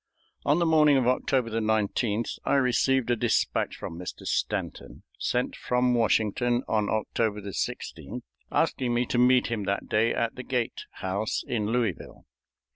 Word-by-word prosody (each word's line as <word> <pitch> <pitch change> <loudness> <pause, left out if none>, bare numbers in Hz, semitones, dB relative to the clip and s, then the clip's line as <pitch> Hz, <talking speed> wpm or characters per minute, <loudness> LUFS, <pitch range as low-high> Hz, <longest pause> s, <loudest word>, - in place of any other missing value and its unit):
On 145 - +4
the 175 - +2
morning 155 -3 +5
of 130 - +2
October 125 -1 +1
19th 110 0 0
I - - +1
received 130 -1 +2
a - - +3
dispatch 120 -2 0
from 80 - -7
Mr. 90 - -7
Stanton, - - -3 0.2
sent 125 +1 -1
from 125 0 +1
Washington 120 +1 +2
on 105 -2 +1
October 110 -1 -1
16th, 100 -1 -5 0.3
asking 120 -2 +1
me 120 +1 +2
to 120 - -1
meet 125 -1 +4
him 105 -4 -2
that 100 +1 -2
day 110 +2 +2
at 115 -1 -1
the 130 - -7
Gait 125 -1 -2 0.2
House 100 +3 -1
in 110 -4 -1
Louisville. 120 0 -2
120 Hz, 150 wpm, -27 LUFS, 110-125 Hz, 0.3 s, morning